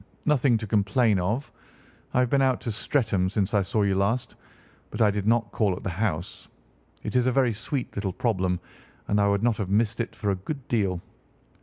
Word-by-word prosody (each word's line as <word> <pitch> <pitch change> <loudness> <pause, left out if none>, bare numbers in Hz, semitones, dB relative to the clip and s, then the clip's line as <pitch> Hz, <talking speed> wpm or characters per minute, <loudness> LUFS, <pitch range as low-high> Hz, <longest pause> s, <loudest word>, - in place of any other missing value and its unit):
Nothing 135 -5 +3
to 110 - -5
complain 105 +1 +2
of. 110 +10 -2 0.6
I 125 - +5
have 125 - +1
been 140 - +4
out 130 -2 +2
to 115 - -3
Streatham 100 -4 0
since 100 +1 -1
I 100 - +4
saw 105 +2 0
you 100 -1 +2
last, 100 +6 0 0.6
but - - -7
I 105 -2 +5
did 100 0 -3
not 115 -2 +2
call 100 -5 +1
at - - -9
the 95 - -2
house. 90 -3 -3 0.6
It - - -4
is 125 0 +3
a - - +3
very 125 -2 +2
sweet 125 +4 -4
little 100 -2 -2
problem, 95 -6 0 0.5
and 105 0 +2
I 100 - +3
would 100 +1 +1
not 120 -2 +2
have 100 -4 -3
missed 110 +3 +1
it 115 - -5
for 105 -2 -1
a - - 0
good 135 +4 -6
deal. 95 -6 0
105 Hz, 210 wpm, -26 LUFS, 100-120 Hz, 0.6 s, I